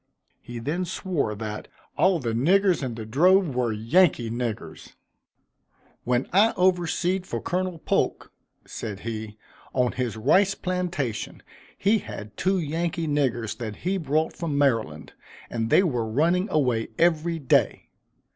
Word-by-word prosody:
He 120 - -8
then 150 +10 -2
swore, 170 - -2
that 105 0 -6 0.3
"all 185 -1 +3
the 120 -7 -3
niggers 180 - +3
in 125 -4 -3
the 110 -1 -6
drove 175 - +3
were 125 -2 0
Yankee 115 - +2
niggers." 120 -2 -5 1.1
"When 125 +1 +1
I 210 +4 +5
overseed 180 0 +1
for - - -3
Colonel 185 0 -2
Polk," - - -1 0.3
said 105 -3 -6
he, 110 -1 -6 0.4
"on 125 -2 +2
his 125 -4 -3
rice 190 - +3
plantation, 180 - -3 0.3
he 210 +3 +3
had 105 - -9
two 190 +1 +1
Yankee 165 0 -2
niggers 130 -7 0
that 110 -3 -5
he 190 +2 +1
brought 155 0 0
from 160 -4 -3
Maryland, 115 - 0 0.4
and 115 -1 -2
they 185 - +5
were 120 - -1
running 170 - +2
away 125 -7 +1
every 170 0 +2
day. 140 -5 +1
145 Hz, 135 wpm, -25 LUFS, 115-180 Hz, 1.1 s, I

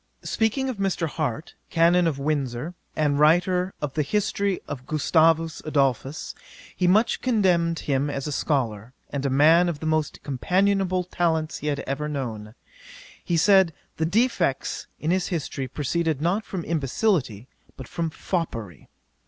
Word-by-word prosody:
'Speaking 225 +5 0
of 255 -4 -3
Mr. 195 -4 0
Harte, 155 -2 -3 0.2
Canon 170 +1 +4
of 150 -4 -1
Windsor, 140 0 -2 0.2
and 145 -2 +1
writer 180 +4 +3
of 140 -2 -2
The 155 - 0
History 200 +3 0
of 130 -3 -7
Gustavus 160 +1 +2
Adolphus, 140 +2 -1 0.4
he 180 - +1
much 210 +6 +3
commended 180 -9 +1
him 140 0 +1
as 140 -2 -3
a 150 - -3
scholar, 125 -6 -1 0.2
and 140 -1 -1
a - - 0
man 160 +6 +5
of 155 -4 -4
the 160 - -6
most 155 -1 -1
companionable 185 +6 +1
talents 165 -3 -1
he 150 - -5
had 140 -1 -1
ever 145 +3 -3
known. 115 -6 -5 0.7
He 170 - 0
said, 190 -1 +5 0.2
the 160 - 0
defects 190 - 0
in 155 - -1
his 185 0 +1
history 150 -6 -3
proceeded 155 +3 -1
not 185 +7 0
from 185 -3 -5
imbecility, 140 - 0 0.3
but 130 - -8
from 165 -1 -2
foppery. 115 - -4
160 Hz, 150 wpm, -25 LUFS, 140-180 Hz, 0.7 s, man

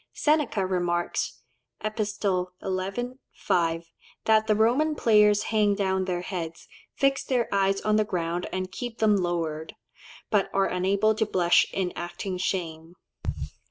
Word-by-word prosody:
Seneca 295 -10 +1
remarks 175 -2 -1 0.4
(Epist. 215 -1 -3
xi. 185 +2 -1 0.3
5) 165 -1 0 0.3
"that 220 0 +4
the 215 - +3
Roman 255 +9 +3
players 210 -4 +4
hang 210 -2 +2
down 190 -2 0
their 180 -1 -2
heads, 170 -3 -5 0.3
fix 275 -1 +2
their 245 -3 0
eyes 195 0 +2
on 215 0 +2
the 215 - +4
ground 175 -3 -2
and 185 0 -3
keep 240 0 -6
them 215 -1 +4
lowered, 165 -3 -2 0.6
but 205 -3 +2
are 195 0 +4
unable 195 +4 +2
to 220 +1 0
blush 175 -4 +4
in 185 -2 -2
acting 180 +2 -4
shame." 165 -3 -3
195 Hz, 135 wpm, -26 LUFS, 175-215 Hz, 0.6 s, that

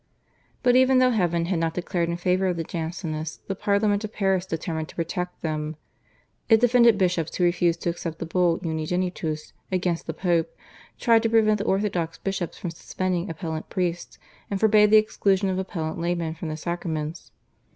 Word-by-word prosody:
But 245 -1 +4
even 260 0 +5
though 255 0 +5
heaven 175 -6 +1
had 175 -1 0
not 165 0 -1
declared 175 -1 -1
in 170 - -2
favour 185 +2 +1
of 180 -2 -1
the 165 - -1
Jansenists 160 -2 -4
the 195 - -2
Parliament 205 +1 +1
of 215 - -5
Paris 190 -3 0
determined 160 -1 -3
to - - -13
protect 180 +2 -4
them. 155 -1 -2 0.7
It 225 -1 +7
defended 235 -2 +5
bishops 180 -4 0
who 180 - 0
refused 175 -1 +2
to 170 - +1
accept 165 -1 -6
the 170 - -4
Bull 170 0 +2
/Unigenitus/ 160 -1 -2 0.2
against 180 -2 -1
the - - -2
Pope, 170 -3 0 0.4
tried 230 -2 +4
to 225 - +1
prevent 215 -2 +4
the 205 - -2
orthodox 190 -5 0
bishops 190 -3 -3
from 175 - -4
suspending 185 +2 -3
appellant 160 0 -5
priests, 175 -2 -2 0.3
and 200 - -2
forbade 210 -1 +5
the 215 - +7
exclusion 200 -2 +2
of 185 0 -1
appellant 170 -4 -4
laymen 170 -1 -1
from 160 0 -6
the 155 - -4
sacraments. 160 -1 -4
180 Hz, 180 wpm, -25 LUFS, 165-200 Hz, 0.7 s, It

